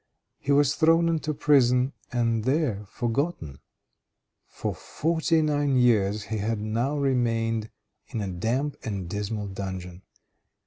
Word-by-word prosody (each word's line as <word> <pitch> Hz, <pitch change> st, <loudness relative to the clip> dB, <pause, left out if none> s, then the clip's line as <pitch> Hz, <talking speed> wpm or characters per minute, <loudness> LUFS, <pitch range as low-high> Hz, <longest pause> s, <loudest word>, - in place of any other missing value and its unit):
He 140 Hz, -, -2 dB
was 140 Hz, -1 st, +4 dB
thrown 165 Hz, +2 st, +4 dB
into 155 Hz, -2 st, 0 dB
prison 130 Hz, -3 st, +3 dB, 0.2 s
and 115 Hz, -2 st, +1 dB
there 130 Hz, -6 st, 0 dB
forgotten. 120 Hz, -, -2 dB, 0.9 s
For -, -, -4 dB
forty 160 Hz, 0 st, 0 dB
nine 145 Hz, -2 st, +1 dB
years 105 Hz, -4 st, +3 dB
he 110 Hz, +1 st, -4 dB
had 110 Hz, +1 st, -1 dB
now 115 Hz, +7 st, -1 dB
remained 115 Hz, -5 st, 0 dB, 0.4 s
in 115 Hz, -, -4 dB
a 100 Hz, -, -2 dB
damp 115 Hz, +11 st, -1 dB
and 100 Hz, -5 st, -4 dB
dismal 105 Hz, +3 st, -3 dB
dungeon. 95 Hz, -2 st, -6 dB
120 Hz, 125 wpm, -26 LUFS, 105-145 Hz, 0.9 s, was